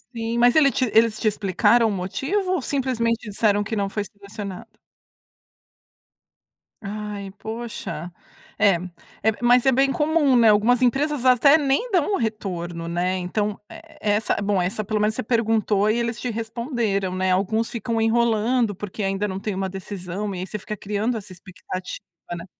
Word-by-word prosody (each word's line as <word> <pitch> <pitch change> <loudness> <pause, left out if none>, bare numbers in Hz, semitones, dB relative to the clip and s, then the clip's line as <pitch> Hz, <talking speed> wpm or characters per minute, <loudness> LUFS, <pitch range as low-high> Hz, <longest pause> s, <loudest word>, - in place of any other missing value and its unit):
Sim, 230 +1 -2
mas 245 +2 +5
ele 280 -3 +5
te 255 -3 0
eles 225 0 +4
te - - 0
explicaram 210 +3 +3
o - - -1
motivo 275 - -2
ou 360 - 0
simplesmente 235 -5 -1
disseram 205 0 +2
que 220 +2 -4
não 200 -2 -1
foi 205 0 -3
selecionada? 200 -1 -8 2.2
Ai, 205 -1 -6
poxa, 220 -7 -6 0.5
é, 200 -3 +5 0.5
é, 220 - +4
mas 245 +1 +5
é 265 - +5
bem 270 +2 +3
comum, 295 -2 +2
né, 230 -2 +6
algumas 220 +4 +4
empresas 270 +2 +1
até 260 +4 +6
nem 290 - 0
dão 370 +1 +2
o - - +2
retorno, 175 -6 -4
né. 180 +2 -1
Então, 205 +3 -2
e 325 -1 -13
essa 210 +1 +1
bom, 200 -2 +1
eh, - - +1
essa 215 +3 -3
pelo 210 +1 -1
menos 215 +1 +1
você - - -3
perguntou 220 -3 +1
e 220 - +2
eles 235 0 -2
te 250 - -2
responderam, 225 -4 -2
né, 185 0 +1
alguns 220 +5 +1
ficam 230 -1 -2
enrolando, 225 0 +2
porque 205 +2 -6
ainda 195 +1 -1
não 190 -1 -4
têm 205 0 -3
uma 190 0 -2
decisão 190 +1 -5
e - - -5
aí 185 - -5
você 210 - -5
fica 210 +2 -6
criando 210 +4 -2
essa 205 -3 -9
expectativa, 185 0 -7 0.4
né. 170 - -8
215 Hz, 175 wpm, -23 LUFS, 195-240 Hz, 2.2 s, né